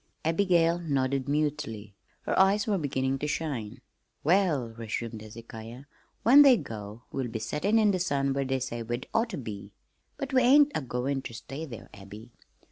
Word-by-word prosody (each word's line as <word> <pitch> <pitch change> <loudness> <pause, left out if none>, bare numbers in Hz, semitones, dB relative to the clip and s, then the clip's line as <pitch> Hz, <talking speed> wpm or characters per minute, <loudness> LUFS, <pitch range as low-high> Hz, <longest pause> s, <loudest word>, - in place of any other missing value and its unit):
Abigail 170 0 +3
nodded 140 -4 -1
mutely. 145 -9 -2 0.3
Her - - -2
eyes 195 +2 +4
were 205 -4 0
beginning 135 -2 -1
to 150 - -2
shine. 140 -9 -4 0.4
"Well," 160 -7 +2
resumed 115 0 -5
Hezekiah, 115 +3 -10 0.4
"when 265 +6 +8
they 270 -4 +7
go 110 - -8
we'll 135 -2 -2
be 115 -1 -4
settin' 150 - 0
in 215 -2 +4
the 185 - -1
sun 140 -6 0
where 140 0 0
they 130 0 -1
say 120 -2 -4
we'd 120 +2 -4
oughter 225 -3 0
be. 105 -5 -7 0.4
But 275 -3 -5
we 255 - +5
ain't 285 +4 +6
agoin' 135 0 -2
ter 120 - -8
stay 135 +7 -7
there, 120 -7 -10
Abby. 105 +4 -12
135 Hz, 165 wpm, -28 LUFS, 115-175 Hz, 0.4 s, when